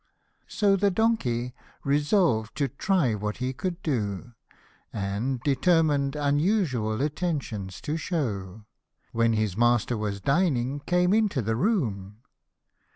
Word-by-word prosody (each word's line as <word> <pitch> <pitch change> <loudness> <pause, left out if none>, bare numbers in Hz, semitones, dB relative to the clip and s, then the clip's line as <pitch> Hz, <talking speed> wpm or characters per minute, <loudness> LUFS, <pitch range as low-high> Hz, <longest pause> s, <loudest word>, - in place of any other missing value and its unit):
So 205 -3 +2
the 200 +1 +2
donkey, 145 - 0 0.3
resolved 145 - +1
to 140 -2 +1
try 140 - +1
what 105 0 -3
he 130 +1 -2
could 185 +4 -4
do, 115 - -2 0.6
And, 105 +6 -2
determined 145 0 +2
unusual 145 - +1
attentions 140 - -3
to 150 +2 -2
shew, 110 - -3 0.5
When 115 0 +2
his 110 -4 0
master 120 +1 +2
was 105 -2 -3
dining 140 - +1
came 180 +4 +2
into 210 - +2
the 110 +2 0
room. 110 - -1
135 Hz, 115 wpm, -26 LUFS, 110-170 Hz, 0.6 s, So